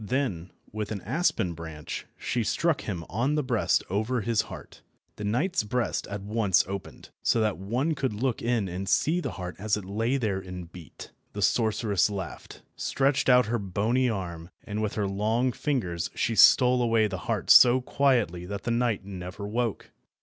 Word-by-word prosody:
Then, 105 -7 -2 0.2
with 105 0 -4
an 100 -3 -4
aspen 115 - 0
branch, 80 -2 -7
she 120 - -1
struck 165 +7 +1
him 85 -6 -5
on 125 - 0
the 150 - +1
breast 125 -4 +1
over 110 +6 -1
his 115 +1 +1
heart. - - -11 0.4
The 105 - -6
knight's 125 - 0
breast 120 +3 -2
at 100 -1 -6
once 100 -3 +2
opened, 100 0 -7
so 115 - +2
that 110 -4 0
one 125 +11 -1
could 140 -4 -1
look 125 +2 -1
in 115 -4 0
and 95 +1 -4
see 165 - +2
the - - -4
heart 90 -1 -6
as 105 +1 0
it 105 - -7
lay 115 +7 0
there 105 -7 -1
and 90 -2 -8
beat. 85 -5 -11 0.2
The - - -2
sorceress 105 -4 +2
laughed, 95 -4 -7
stretched 135 0 +1
out 125 0 +6
her 120 +2 -1
bony 110 +6 0
arm, 85 -5 -5
and 105 -1 -4
with 105 -1 -2
her 105 - 0
long 110 +6 0
fingers 105 - -2
she 115 - 0
stole 125 +2 +6
away 115 -2 +3
the 95 -3 -3
heart - - +1
so 125 +1 +8
quietly 120 -10 +1
that 100 0 -5
the 120 - -1
knight 115 -4 0
never 95 +1 -7
woke. 115 0 -2
110 Hz, 180 wpm, -27 LUFS, 95-125 Hz, 0.4 s, so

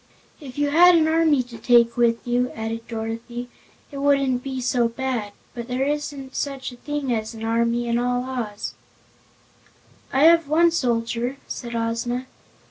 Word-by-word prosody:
"If 270 -4 -10
you 290 0 +1
had 350 +3 +7
an 315 -1 +4
army 315 -4 +3
to 235 -2 -12
take 235 0 +4
with 235 -1 +2
you," 245 +1 +1
added 225 +1 -5
Dorothy, 230 +2 -5 0.4
"it 280 - -6
wouldn't 275 -3 +2
be 265 0 -4
so 245 -1 +1
bad; 235 -3 -3 0.2
but 235 -1 -6
there 255 +1 -1
isn't 290 -2 -4
such 275 -2 -3
a 245 - -12
thing 290 -1 -2
as 220 0 -3
an 225 - -8
army 235 +1 +1
in 235 0 +1
all 245 0 0
Oz." 235 -5 -4 1.4
"I 270 - +3
have 330 -1 +6
one 335 +3 +4
soldier," 240 -3 -1
said 235 -2 -6
Ozma. 230 +2 -2
245 Hz, 160 wpm, -23 LUFS, 235-280 Hz, 1.4 s, had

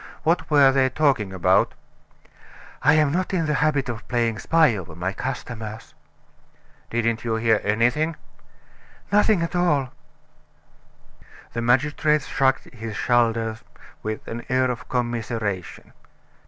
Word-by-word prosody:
What 165 +3 +1
were 140 -3 +6
they 130 -1 +2
talking 130 -8 +1
about?" 95 -2 +2 1.1
"I 145 +3 +5
am 150 -2 +3
not 185 +3 -1
in 165 -3 0
the 150 - 0
habit 145 -2 +1
of 115 -1 -6
playing 115 -3 0
spy 160 -1 +3
over 85 -5 -8
my 90 +3 -3
customers." 115 -4 -6 1.0
"Didn't 115 -1 -1
you 115 -1 -1
hear 110 -1 +2
anything?" 120 +10 +1 1.0
"Nothing 205 -3 +3
at 165 - -4
all." 150 -7 +1 1.6
The 115 - -2
magistrate 150 +5 +2
shrugged 135 0 +1
his 110 -2 -7
shoulders 115 -2 +1 0.4
with 110 0 -5
an 115 +1 -5
air 130 0 +2
of 120 - -8
commiseration. 115 -6 -3
125 Hz, 125 wpm, -23 LUFS, 115-150 Hz, 1.6 s, were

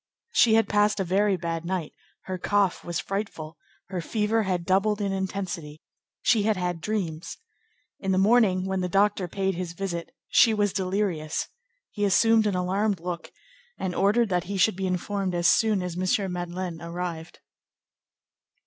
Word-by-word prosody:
She 225 -2 +5
had 225 - +3
passed 210 0 +2
a - - +2
very 195 +2 +2
bad 165 -1 -3
night; 175 -2 -3 0.3
her 185 -1 -5
cough 200 0 +1
was 175 -1 -3
frightful; 190 -6 -4 0.3
her 185 -2 -3
fever 220 +4 0
had 185 -4 -1
doubled 195 +3 +2
in 200 -1 -1
intensity; 190 -5 -4 0.4
she 225 - +4
had 215 0 +1
had 175 -2 -2
dreams: 175 -5 -3 0.6
in 195 - -1
the 185 - +2
morning, 195 -2 +4
when 190 -1 -1
the 180 - -2
doctor 195 -1 +2
paid 195 +2 -1
his 175 -1 -5
visit, 170 -2 -4 0.2
she 225 -2 +5
was 205 -2 +1
delirious; 185 -5 -1 0.4
he 205 - -3
assumed 220 +2 +4
an 200 - 0
alarmed 190 +2 0
look, 175 0 -5 0.5
and 185 -1 -3
ordered 210 +5 +2
that 180 -2 0
he 200 +2 -3
should 190 +2 +3
be 190 0 -2
informed 185 +1 -2
as 175 0 +2
soon 215 -5 +3
as 180 -2 -4
M. 185 +2 0
Madeleine 175 -1 -4
arrived. 170 -1 -5
190 Hz, 165 wpm, -26 LUFS, 175-205 Hz, 0.6 s, She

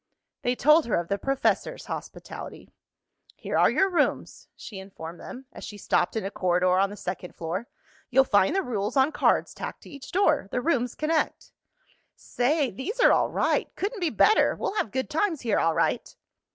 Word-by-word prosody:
They 245 +1 0
told 300 +2 +4
her 230 - +1
of 170 0 -2
the 200 - -1
professor's 270 0 -1
hospitality. - - -8 0.6
"Here - - -5
are - - +5
your 390 - +3
rooms," 360 -3 -1
she 200 -4 -9
informed 175 -3 -9
them, 260 +1 -9
as - - -10
she 210 - -8
stopped 175 -1 0
in 220 - -2
a 195 - -3
corridor 180 -1 +2
on 195 0 +3
the 205 - -9
second 180 -1 -6
floor. 175 +8 -4 0.4
"You'll 265 +1 +5
find 205 - +3
the 390 - +1
rules 215 0 -2
on 270 +3 +4
cards - - +1
tacked - - -7
to - - -13
each 280 -3 -10
door. 380 - +2
The 250 - -1
rooms 250 -4 0
connect." 310 0 -1 0.6
"Say, 275 +2 0
these 385 - -5
are - - +6
all - - +3
right!" - - 0
"Couldn't 410 +2 -3
be 345 - +2
better!" 430 - +4
"We'll - - -3
have 415 - -1
good 260 +4 -2
times 320 0 0
here 225 -4 +1
all 165 -1 +2
right!" - - 0
245 Hz, 190 wpm, -26 LUFS, 195-310 Hz, 0.6 s, are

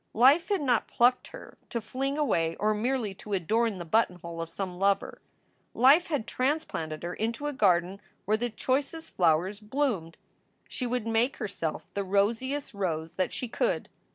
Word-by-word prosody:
Life 275 - +5
had 400 -5 +1
not 245 -5 +2
plucked 245 +1 +3
her - - -12
to 235 - -2
fling 270 +6 -3
away 165 - +1
or 215 +1 +1
merely 225 -1 -1
to 205 +2 -8
adorn 215 +4 +1
the 175 - -6
buttonhole 170 -3 0
of 165 - -5
some 180 -2 -5
lover. 195 0 +1 0.5
Life 280 +8 +6
had 290 -9 -1
transplanted 255 - -2
her 175 +1 -3
into 230 +6 -3
a 295 - -1
garden 190 -4 +2 0.2
where 215 - +3
the 240 +2 -1
choicest 275 +7 -2
flowers 175 +4 +2
bloomed. 215 - -2 0.5
She 250 - -3
would 245 -2 -1
make 230 +3 +1
herself 195 -8 -3
the 200 - -1
rosiest 230 +9 0
rose 165 -5 -2
that 185 - -1
she 250 - -4
could. - - -1
215 Hz, 165 wpm, -28 LUFS, 185-260 Hz, 0.5 s, Life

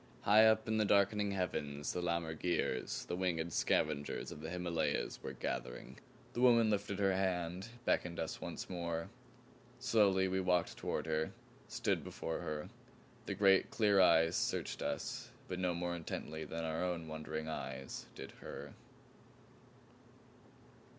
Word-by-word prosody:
High 110 +2 +7
up 110 0 +3
in 110 0 +1
the 110 - +4
darkening 100 0 +3
heavens 75 -7 -2
the 90 - -2
lammergeiers, 85 -5 -1
the 85 - -3
winged 85 -3 -1
scavengers 75 -2 0
of 75 - -8
the 80 - -5
Himalayas, 85 -2 -1
were - - -5
gathering. - - -5 0.3
The 120 - -2
woman 115 -3 +6
lifted 100 -1 -1
her 95 -1 +3
hand, 95 +1 -1 0.2
beckoned 85 -1 +1
us 80 -1 -3
once - - -5
more. 85 -2 -3 0.7
Slowly 95 -4 +3
we 95 0 0
walked 90 -2 +1
toward - - -2
her, 80 0 -1 0.3
stood - - 0
before 80 - -4
her. 75 +3 -4 0.6
The 100 - -2
great 95 -1 +5
clear 105 -3 +4
eyes 80 -2 +5
searched - - -1
us - - -3 0.2
but 90 -1 -4
no 90 -2 +1
more 85 0 -2
intently 80 -1 -5
than 80 +2 -4
our 80 +1 -1
own 85 -3 -2
wondering 80 0 -4
eyes 65 -4 -5
did - - -8
her. - - -7
90 Hz, 145 wpm, -36 LUFS, 80-95 Hz, 0.7 s, High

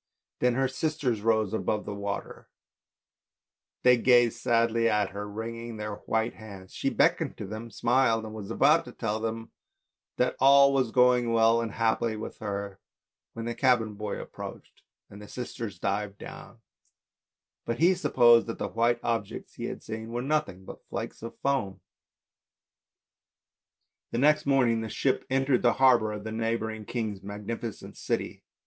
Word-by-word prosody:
Then 125 -1 +2
her 135 +1 +2
sisters 135 -5 -1
rose 110 -2 +1
above 105 -1 -1
the 105 - -5
water, 100 0 -6 1.3
they 125 0 +6
gazed 120 -1 +4
sadly 115 0 +2
at 105 -3 +1
her, 100 +1 -6
wringing 115 +2 -6
their 105 -1 -5
white 110 +1 0
hands; 100 -4 -12
she - - -1
beckoned - - +1
to - - -6
them, 110 +4 -7
smiled, 115 -1 +2
and 110 - -8
was 105 -2 -7
about - - +4
to - - -10
tell 110 -1 -2
them 115 0 -4 0.7
that 125 - +1
all 140 +1 +6
was 130 -3 +1
going 125 0 +3
well 115 0 +4
and 115 -3 -4
happily 115 0 0
with 110 - -7
her, 100 -2 -5 0.5
when 115 0 -6
the 120 - -2
cabin 120 -3 +2
boy 105 0 -5
approached, - - -10 0.3
and 100 - -12
the 105 - -10
sisters 120 -5 -6
dived 100 +2 -2
down, - - -11 1.0
but 115 - -3
he 175 +4 +5
supposed 120 -10 +4
that 115 - -4
the - - -3
white 120 +1 +1
objects 115 -1 -3
he - - -6
had - - -6
seen 110 +1 -6
were 120 +1 -3
nothing 145 -10 -1
but - - -11
flakes - - -6
of 115 +1 -8
foam. 105 -9 0 2.3
The - - -3
next 150 +3 +3
morning 125 -5 +3
the 110 - -5
ship 130 +4 -1
entered 135 -1 +2
the 120 -1 +4
harbour 120 -5 +4
of 105 -1 -6
the 110 - -5
neigh 115 +1 0
bouring 110 -1 -6
king's 110 -5 -3
magnificent 105 +3 -6
city. - - -3
115 Hz, 160 wpm, -28 LUFS, 105-125 Hz, 2.3 s, they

